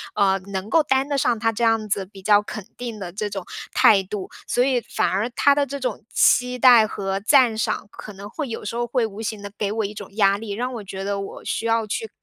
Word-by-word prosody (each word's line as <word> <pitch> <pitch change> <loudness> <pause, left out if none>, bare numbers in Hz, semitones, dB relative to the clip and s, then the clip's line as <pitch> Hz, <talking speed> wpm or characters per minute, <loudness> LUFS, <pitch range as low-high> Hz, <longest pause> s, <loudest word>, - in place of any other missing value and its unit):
呃， 195 -2 +3
能 190 +1 -4
够 325 +4 +4
担 270 -1 +1
得 285 -1 -1
上 245 -3 +2
他 225 +1 +1
这 235 - -2
样 225 -1 +2
子 195 -2 -1
比 195 0 -14
较 205 +1 +4
肯 210 -1 -7
定 235 -3 -6
的 180 -3 -6
这 210 +1 -3
种 195 -3 -6 0.3
态 195 -3 +5
度。 190 0 -6 0.2
所 245 - +2
以 255 -2 +1
反 - - -1
而 205 +5 -1
他 285 +4 +4
的 285 0 +1
这 280 +1 -6
种 250 -5 -3
期 250 0 +3
待 240 -3 +7
和 195 -2 -3
赞 235 +1 +4
赏， 225 - -2
可 210 - -10
能 200 +1 -9
会 290 +5 -4
有 225 - -6
时 220 - -4
候 240 0 -1
会 240 -1 +1
无 215 0 -7
形 215 -2 -4
地 200 0 -8
给 205 -1 -1
我 220 0 -1
一 200 - -5
种 205 -2 -8
压 200 -2 +4
力， 215 0 -7
让 245 +5 -3
我 230 -3 -6
觉 190 0 -6
得 200 0 -2
我 195 - -7
需 - - -2
要 225 -1 +1
去 445 - -3
220 Hz, 275 characters per minute, -22 LUFS, 200-245 Hz, 0.3 s, 待